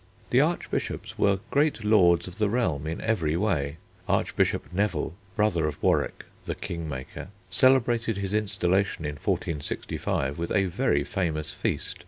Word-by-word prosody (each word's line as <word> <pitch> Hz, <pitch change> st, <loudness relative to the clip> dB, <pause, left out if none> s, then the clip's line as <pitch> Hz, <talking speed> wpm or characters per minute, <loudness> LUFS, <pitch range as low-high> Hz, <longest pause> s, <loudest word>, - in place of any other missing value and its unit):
The -, -, +6 dB
Archbishops -, -, -2 dB
were 100 Hz, -1 st, +3 dB
great 145 Hz, -5 st, +2 dB
lords 90 Hz, -5 st, +4 dB
of 90 Hz, +3 st, -10 dB
the 105 Hz, -2 st, +2 dB
realm 80 Hz, -, 0 dB
in 80 Hz, -, -3 dB
every 85 Hz, -8 st, +1 dB
way. 80 Hz, -7 st, 0 dB, 0.3 s
Archbishop -, -, +1 dB
Neville, 90 Hz, -5 st, 0 dB, 0.2 s
brother 90 Hz, -7 st, +2 dB
of 75 Hz, -, -4 dB
Warwick -, -, +1 dB, 0.2 s
"the -, -, -2 dB
king 85 Hz, -2 st, -5 dB
maker," 65 Hz, +3 st, -6 dB, 0.2 s
celebrated 120 Hz, 0 st, +3 dB
his 100 Hz, 0 st, -2 dB
installation 100 Hz, -4 st, +1 dB
in 75 Hz, -, -1 dB
1465 70 Hz, -1 st, -2 dB
with 85 Hz, -, -3 dB
a 100 Hz, -1 st, +3 dB
very 90 Hz, -, +1 dB
famous 80 Hz, -3 st, -2 dB
feast. -, -, -2 dB
90 Hz, 145 wpm, -27 LUFS, 80-105 Hz, 0.3 s, The